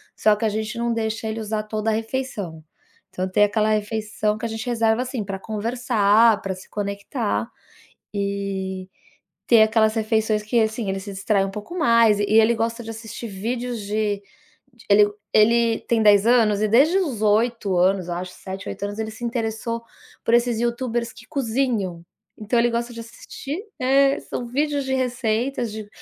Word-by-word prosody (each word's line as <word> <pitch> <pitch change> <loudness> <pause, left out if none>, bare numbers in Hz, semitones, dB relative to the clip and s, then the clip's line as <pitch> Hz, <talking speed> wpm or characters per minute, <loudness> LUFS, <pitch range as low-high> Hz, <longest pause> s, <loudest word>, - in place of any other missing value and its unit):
só 215 -1 +4
que 210 - -2
a 220 - +3
gente 215 +2 -3
não 235 0 0
deixa 220 0 -2
ele 220 +1 -3
usar 215 0 -2
toda 215 +1 -2
a - - +2
refeição. 220 - -4 0.5
Então, 185 +1 -3
tem 205 +2 +4
aquela 210 +1 +1
refeição 215 0 -1
que 230 - -5
a 230 - -2
gente 220 +1 -5
reserva, 225 -1 +2
assim, 255 -3 -4
pra 195 -1 -5
conversar, 220 0 +2
pra 195 -1 -3
se 185 - -13
conectar 205 +3 -3 0.6
e 195 -2 -3 0.6
ter 230 -2 +6
aquelas 220 0 +3
refeições 220 -1 +1
que, 230 +2 +1
assim, 220 -1 0
ele 195 0 -2
se 200 +1 -8
distrai 195 0 +1
um 195 - -5
pouco 210 - -7
mais 230 - +4
e - - +1
ele 225 +2 +4
gosta 230 +1 -2
de 225 - -8
assistir 225 +1 -7
vídeos 235 +4 -3
de 205 0 -1 0.7
ele 205 0 +6 0.2
ele 230 +1 +4
tem 230 -1 +2
10 205 -1 +6
anos 220 -4 +4
e 215 - +3
desde 280 - +4
os 285 - -1
8 215 -2 +2
anos, 185 0 +2
eu 175 - -3
acho, 180 +1 -5
7, 190 0 -7
8 - - -6
anos, 205 +1 -4
ele 220 0 -3
se 225 +2 -11
interessou 230 0 -3 0.4
por 230 - +1
esses 240 -1 +3
YouTubers 235 0 -1
que - - -15
cozinham. 235 - -1 0.3
Então, 220 +3 -1
ele 240 0 +3
gosta 235 +1 -2
de 230 - -9
assistir, 280 - -7 0.2
eh, 275 +1 +3
são 240 - -5
vídeos 285 +3 0
de 265 - -1
receitas 245 -1 -1
de 215 -1 -7
220 Hz, 180 wpm, -23 LUFS, 205-235 Hz, 0.7 s, ter